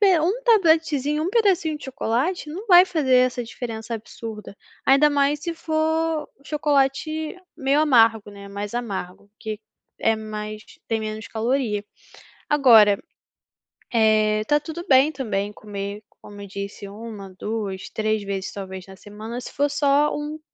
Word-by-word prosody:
pe 385 -5 +5
um 395 +11 0
tabletezinho, 320 - +3
um 365 - -1
pedacinho 385 -8 +2
de - - -11
chocolate, 270 +6 -1
não 385 +9 -7
vai 360 -1 +8
fazer 310 -8 +1
essa 250 -1 +2
diferença 230 -1 -6
absurda, 220 -2 -8 0.3
ainda 275 +3 +6
mais 285 +1 +2
se 340 0 -4
for 320 -1 -1 0.2
chocolate 300 +3 0 0.2
meio 275 +2 +2
amargo, 225 -7 +4
né, 200 0 -11
mais 205 +2 -6
amargo, 200 -4 -5
que 215 -1 -5 0.4
é 225 0 +3
mais 215 0 -6 0.3
tem 225 -1 0
menos 215 0 -5
caloria. 225 -2 -1 0.6
Agora, 230 -8 +6 0.9
eh, 215 -1 +3
tá 295 +5 +3
tudo 335 +4 -7
bem 270 +3 +5
também 210 -7 -3
comer, 205 0 -6 0.2
como 205 -1 -11
eu 200 - -8
disse, 200 +1 -7
1, 205 -2 -9
2, 210 -4 -4
3 215 -1 -1
vezes, 195 -1 -4
talvez, 190 -2 -7
na 190 - -11
semana 215 +4 -8
se - - -8
for 285 +2 +1
só 285 +1 +2
um 295 +1 -5
240 Hz, 145 wpm, -23 LUFS, 210-300 Hz, 0.9 s, vai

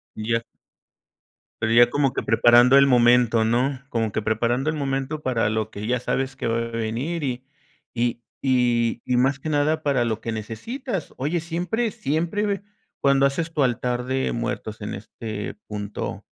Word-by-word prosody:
Y 110 +1 -4
ya 115 - +2 1.2
pero, 110 +1 +1
ya 120 +1 +7
como 140 -1 +2
que - - -2
preparando 120 +3 +6
el 140 0 +6
momento, 120 -2 +4
¿no? 125 +4 +1
Como 115 -4 -1
que 110 - -1
preparando 120 +6 0
el 155 - -1
momento, 140 +1 -2
para 115 -6 +1
lo 110 0 -1
que 105 -1 -7
ya 125 +2 0
sabes 135 +2 -2
que - - -3
va 115 0 +1
a 115 - 0
venir, 115 +9 -2
y 125 -2 -3 0.5
y 120 0 -1 0.2
y 120 -3 +2
y 125 -1 +1
más 135 +2 +2
que 155 - -5
nada 155 +2 +1
para 140 -4 +2
lo 110 -1 -2
que 115 - -3
necesitas. 185 - -5
Oye, 150 +6 -1
¿siempre 180 +8 -2
siempre 195 +7 -1 0.4
cuando 140 0 +4
haces 160 +4 -3
tu 150 - 0
altar 125 0 0
de 130 +1 -1
muertos 115 -2 -4
en 105 - -4
este 105 +1 -6
punto, 105 -1 -5
125 Hz, 170 wpm, -23 LUFS, 115-145 Hz, 1.2 s, ya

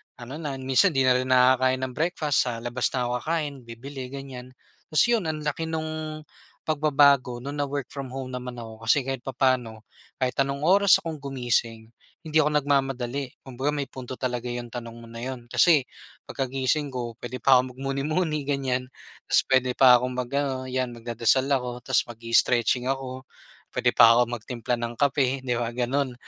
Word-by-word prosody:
ano 130 +5 -8
na, 145 -4 -4
minsan 135 +6 +2
'di 135 - +3
na 130 - +5
rin 130 +1 0
nakakain 130 0 +4
ng 130 - -2
breakfast. 155 -4 0
Sa 120 -2 -2
labas 120 +1 0
na 125 - 0
ako 120 - -2
kakain, 155 -1 -2
bibili, 130 +3 -8
ganiyan. 135 -2 -8 0.4
Ta's 195 +10 +4
yun, 230 -6 +2
ang 155 -1 -3
laki 150 +2 -2
nung 155 -1 -4 0.4
pagbabago 140 -5 +3
nung 140 +3 -6
na 145 - 0
work 140 -1 -4
from 135 -3 -7
home 130 -1 -5
naman 125 -1 -6
ako 110 0 -10
kasi 135 +5 +4
kahit 130 -1 -5
papa'no, 125 -4 0 0.4
kahit 130 0 0
anong 140 0 0
oras 195 +4 +5
akong 160 -2 -5
gumising, 120 -5 -2 0.3
hindi 155 0 -1
ako 150 -1 +3
nagmamadali. 135 -2 -1
Kumbaga 135 +3 -3
may 145 -2 -3
punto 130 -1 -8
talaga 125 -1 -3
yung 120 -1 -6
tanong 115 -1 -7
mo 115 0 -12
na 115 - -10
yun, 125 -2 -7
kasi 155 +1 +5 0.5
pagkagising 135 +2 -1
ko, 120 -3 -5
puwede 120 0 -7
pa 130 -1 +6
akong 130 0 -1
magmuni-muni, 145 +3 -2
ganiyan. 130 -3 -1 0.4
Tapos - - +4
puwede 130 -1 +3
pa 125 -2 +7
akong 125 +1 -3
mag-ano, 130 +1 -2
'yan 130 -1 -2
magdadasal 120 +3 +1
ako 125 -3 -1
ta's 130 0 +1
mag-i-stretching 120 +1 +1
ako. 130 -1 -4 0.5
Puwede - - +2
pa 115 0 +9
ako 120 0 +3
magtimpla 120 +1 -3
ng 120 0 -4
kape 135 0 +1
di 125 -2 -1
ba, 120 -1 -2
gano'n. 125 +2 -1
130 Hz, 175 wpm, -25 LUFS, 125-140 Hz, 0.5 s, pa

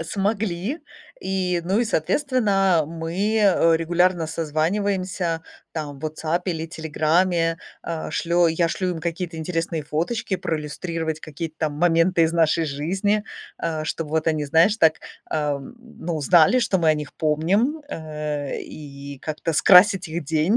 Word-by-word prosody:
Смогли 200 - -2 0.4
и, 185 -2 -1
ну, 190 +4 +1
и 240 - +2
соответственно 195 - +2
мы, 165 0 -5 0.2
э, 185 -6 +4
регулярно 175 +1 +1
созваниваемся 170 +2 -1 0.3
там 145 -3 -5
в - - -18
"Ватсапе" 160 +3 -2
или 160 -1 -4
"Телеграме". 165 +1 +1 0.3
Э, 165 -2 -4
шлё 170 0 +2
я 165 +1 +1
шлю 185 +2 -1
им 160 - -6
какие-то 170 0 -4
интересные 165 -1 -2
фоточки 175 +7 -2
проиллюстрировать 160 0 -3
какие-то 155 +1 -6
там 150 -2 -1
моменты 165 +1 +3
из 160 +1 +2
нашей 165 0 +2
жизни, 190 +9 0 0.4
а, 155 -2 -2
чтобы 155 -1 -4
вот 160 0 0
они, 155 -2 0
знаешь, 165 +8 +4
так, 160 -4 +5 0.4
э, 150 -2 0
ну 175 - -7
знали, 175 - +5
что 210 -5 +1
мы 165 -2 +2
о 155 - +5
них 150 -1 -6
помним, 195 - +1
э, 150 - -4
и 140 -2 -9
как-то 155 +1 -3
скрасить 185 +3 +6
их 165 0 -4
день. 160 - +2
165 Hz, 145 wpm, -23 LUFS, 155-185 Hz, 0.4 s, скрасить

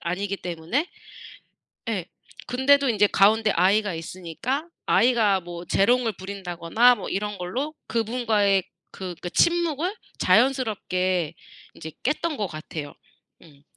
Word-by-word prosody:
아니기 190 +3 -2
때문에. 180 - -3 1.0
예. 195 -7 -2 0.4
근데도 275 +2 +3
인제 210 -3 +3
가운데 215 +3 +4
아이가 195 +2 +2
있으니까 185 - -4 0.2
아이가 225 -5 +3
뭐 175 0 -8
재롱을 230 +6 +2
부린다거나 190 +4 +2
뭐 205 - -7
이런 205 +1 -3
걸로 255 - -3
그분과의 220 -4 +1 0.3
그 - - -14
그러니까 180 -2 -5
침묵을 340 - +1 0.2
자연스럽게 185 - +1 0.4
인제 160 -1 -9
깼던 305 +3 0
것 205 - -1
같아요. 155 -3 -7 0.5
음. 145 -4 -19
205 Hz, 285 characters per minute, -24 LUFS, 180-245 Hz, 1.0 s, 가운데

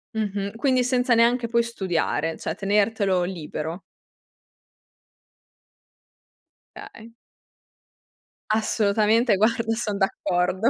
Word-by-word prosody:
Mh-mh. 200 -1 -3
Quindi 255 +1 +1
senza 250 -1 +2
neanche 235 +1 +3
poi 235 0 +2
studiare, 175 -7 -2
cioè - - -4
tenertelo 200 -2 +1
libero. 165 -1 -5 3.0
Okay. 225 +1 -12 1.4
Assolutamente. 215 +1 +2
Guarda 225 +1 +1
son 210 -3 -3
d'accordo, 190 +2 0
215 Hz, 80 wpm, -24 LUFS, 195-230 Hz, 3.0 s, neanche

